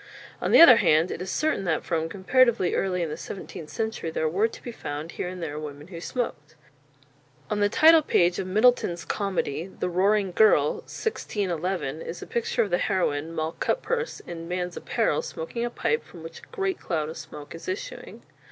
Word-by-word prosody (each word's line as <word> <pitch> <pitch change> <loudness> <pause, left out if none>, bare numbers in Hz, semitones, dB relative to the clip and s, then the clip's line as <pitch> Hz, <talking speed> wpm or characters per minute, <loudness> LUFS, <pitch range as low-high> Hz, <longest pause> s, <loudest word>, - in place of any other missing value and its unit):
On - - 0
the - - +8
other 250 -8 +10
hand, 160 -3 +3
it - - -5
is 185 - -4
certain 310 -2 0
that 160 -3 0
from 165 -2 -1
comparatively 220 +1 +3
early 180 -2 0
in 165 - -2
the - - -3
seventeenth 165 -4 -8
century 220 -7 -3
there 160 0 -1
were 195 +8 +2
to - - -12
be 240 - -5
found 150 -6 -6
here - - -4
and 180 -1 -6
there 150 -2 -4
women 150 +1 -8
who 170 -3 -8
smoked. 165 - -4 1.0
On 210 - 0
the 205 0 +3
title 320 +7 +7
page 175 - +2
of 185 - -3
Middleton's 200 -4 +2
comedy, 185 -5 -2
"The 180 -1 -4
Roaring 195 +2 +2
Girle," 175 -8 +4
1611, 180 - -2
is 170 - -6
a - - -7
picture 235 - 0
of 205 - -5
the 175 - +2
heroine, 160 -4 0
Moll 160 -1 -2
Cutpurse, 485 -1 -1
in 165 -1 -7
man's 180 0 -3
apparel, - - 0
smoking 480 - -5
a 240 - -1
pipe, 460 - -1
from 170 -2 -13
which 165 0 -9
a - - -17
great 390 -5 -2
cloud 155 -4 -2
of 160 - -7
smoke 145 -1 -9
is 165 - -10
issuing. 395 +7 -6
180 Hz, 195 wpm, -26 LUFS, 165-225 Hz, 1.0 s, other